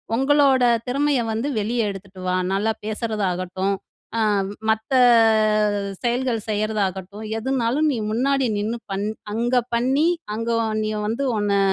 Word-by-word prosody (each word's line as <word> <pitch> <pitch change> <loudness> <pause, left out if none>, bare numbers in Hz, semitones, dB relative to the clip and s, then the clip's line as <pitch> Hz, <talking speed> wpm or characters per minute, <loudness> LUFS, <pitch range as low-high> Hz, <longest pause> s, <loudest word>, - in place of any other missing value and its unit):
உங்களோட 270 0 +4 0.3
திறமைய 280 +1 +1
வந்து 230 +6 -2
வெளிய 230 +3 0
எடுத்துட்டு 195 -1 -9
வா. 180 - +1 0.2
நல்லா 210 +3 +1
பேசுறதாகட்டும், 195 -4 -2 0.4
அ 225 - +1 0.5
மத்த 220 +4 0 1.1
செயல்கள் 245 -1 0
செய்றதாகட்டும், 205 -1 -2
எதுனாலும் 265 +4 0
நீ 240 - -2
முன்னாடி 265 +2 +1
நின்னு 220 +3 -2
பண் 195 +1 -2 0.3
அங்க 240 +3 -1 0.2
பண்ணி 265 +6 +2 0.3
அங்க 230 +1 -3 0.3
நீ 215 - -1 0.2
வந்து 230 +6 -1
உன்ன 200 -1 +1
225 Hz, 120 wpm, -22 LUFS, 205-255 Hz, 1.1 s, உங்களோட